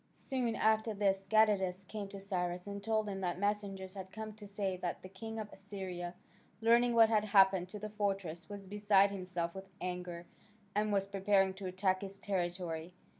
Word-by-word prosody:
Soon 250 -4 -1
after 220 0 +2
this 195 -1 +1
Gadatas 195 -4 +3
came 210 -2 -5
to 195 0 -8
Cyrus 180 -2 -2
and 200 0 -5
told 220 0 +1
him 195 -1 -3
that 175 -2 -1
messengers 200 -2 -1
had 190 -2 -7
come 220 +1 -6
to 210 -1 -11
say 200 -2 -2
that 175 -1 -4
the 185 - -8
king 220 +4 -7
of 215 -1 -3
Assyria, 185 -3 -6 0.4
learning 235 +1 +4
what 225 -1 +7
had 215 -2 +3
happened 190 -3 +5
to 210 - -6
the 215 +1 -5
fortress, 195 -5 -2
was 200 -1 -7
beside 200 0 +4
himself 180 -3 -3
with 190 0 -8
anger, 180 -1 -4 0.5
and 210 +1 +1
was 195 -1 +1
preparing 195 -1 +3
to 190 0 -6
attack 185 0 +1
his 195 0 -6
territory. 175 -3 -2
195 Hz, 180 wpm, -34 LUFS, 185-210 Hz, 0.5 s, what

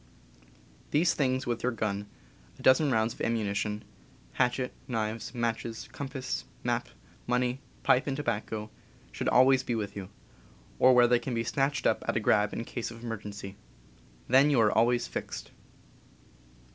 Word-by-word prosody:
These 170 +4 +3
things 130 -2 0
with 120 -1 -2
your 125 - +1
gun, 105 -3 -2 0.5
a - - -13
dozen 140 +3 +5
rounds 110 -1 +2
of - - -12
am 115 - +1
munition, 105 0 -2 0.5
hatchet, 125 - 0
knives, 110 -2 -2
matches, 115 -1 -2
compass, 135 -2 -4 0.2
map, - - -1 0.4
money, 125 +1 +1 0.2
pipe 130 - +3
and 135 -1 -1
tobacco, 110 -5 -3 0.4
should - - -1
always 130 +1 +5
be 120 - -2
with 105 -2 -3
you, 95 -2 -6 0.7
or 130 0 +7
where 120 -1 +7
they 120 0 +4
can 125 -1 -4
be 115 - 0
snatched 135 +4 0
up 110 - +2
at - - +1
a - - +3
grab 105 -1 +3
in 115 - -4
case 120 -1 -4
of 115 0 -11
emergency. 105 -3 -6 0.7
Then 135 +4 +6
you 140 -4 +3
are 105 -2 +4
always 120 +2 +3
"fixed." - - -6
120 Hz, 160 wpm, -29 LUFS, 110-130 Hz, 0.7 s, or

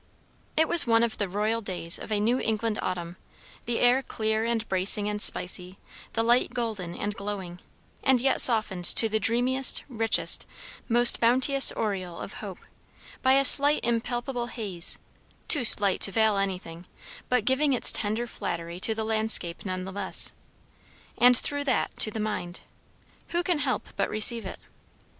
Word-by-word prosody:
It 320 0 +2
was 340 -7 +4
one 230 0 +2
of 235 -2 -4
the 200 -3 -3
royal 215 +4 -3
days 180 -4 -3
of - - -10
a 210 - -1
New 235 +5 -1
England 220 -1 -3
autumn; 175 -1 -6 0.5
the 235 0 -3
air 245 +2 +2
clear 220 -3 -4
and 230 -1 -3
bracing 195 +2 0
and 210 0 -4
spicy; 180 0 -1 0.4
the 225 - -2
light 240 +1 0
golden 215 -8 -5
and 205 - -5
glowing, 200 -4 -8 0.4
and 265 -2 +2
yet 270 +2 +3
softened 215 -7 +3
to 225 - +10
the 220 0 -2
dreamiest, 250 +4 +1
richest, 225 -4 0 0.4
most 240 +1 +5
bounteous 260 +3 +4
aureole 185 -5 -5
of - - -9
hope, - - -9 0.6
by 260 0 +2
a 275 0 +2
slight 290 +2 +5
impalpable 240 +1 -4
haze; 200 -7 -2 0.5
too 290 -6 +1
slight 205 -4 +5
to 195 - +5
veil 220 0 +1
anything, 180 -3 -6 0.4
but 250 -4 -1
giving 275 +3 0
its 250 - +3
tender 220 +2 -4
flattery 170 -6 -7
to 220 +4 +3
the 220 - -4
landscape 220 -6 0
nevertheless. 190 +1 -3 0.9
And 245 +1 +5
through 285 +3 -3
that 260 -4 -2
to - - +5
the 220 - -8
mind. 210 -5 -6 0.7
Who 345 +1 -3
can 350 -3 -1
help - - -4
but - - -3
receive 215 0 0
it? - - -9
220 Hz, 160 wpm, -25 LUFS, 195-245 Hz, 0.9 s, to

